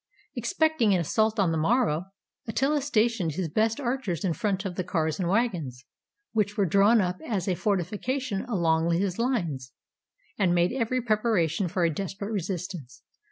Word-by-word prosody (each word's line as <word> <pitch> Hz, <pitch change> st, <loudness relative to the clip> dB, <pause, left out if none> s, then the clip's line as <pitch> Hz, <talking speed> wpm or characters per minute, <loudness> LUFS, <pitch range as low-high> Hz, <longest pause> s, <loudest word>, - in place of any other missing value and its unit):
Expecting 315 Hz, -, +2 dB
an -, -, +2 dB
assault 220 Hz, +7 st, +1 dB
on 185 Hz, -4 st, +3 dB
the 160 Hz, -, 0 dB
morrow, 180 Hz, -3 st, +2 dB, 0.4 s
Attila 275 Hz, +6 st, +1 dB
stationed 225 Hz, -, +1 dB
his 170 Hz, +1 st, -2 dB
best 220 Hz, -, +1 dB
archers 240 Hz, -, -2 dB
in 175 Hz, -, +1 dB
front 200 Hz, 0 st, -1 dB
of 190 Hz, -, -3 dB
the 185 Hz, -, -2 dB
cars 160 Hz, -2 st, -1 dB
and 175 Hz, -2 st, 0 dB
wagons, 175 Hz, -, -1 dB, 0.5 s
which 210 Hz, -1 st, 0 dB
were 200 Hz, -, +3 dB
drawn 200 Hz, +6 st, +5 dB
up 180 Hz, -1 st, -2 dB
as 200 Hz, -4 st, -2 dB
a 185 Hz, -, +2 dB
fortification 210 Hz, -, -1 dB
along 170 Hz, -7 st, +1 dB
his 185 Hz, +2 st, -1 dB
lines, 170 Hz, -, -1 dB, 0.7 s
and 180 Hz, -3 st, +3 dB
made 175 Hz, +5 st, +2 dB
every 255 Hz, 0 st, -1 dB
preparation 210 Hz, -6 st, +1 dB
for 180 Hz, +1 st, -1 dB
a 165 Hz, -2 st, +2 dB
desperate 200 Hz, +4 st, -4 dB
resistance. 180 Hz, -, -5 dB
195 Hz, 160 wpm, -27 LUFS, 170-225 Hz, 0.7 s, drawn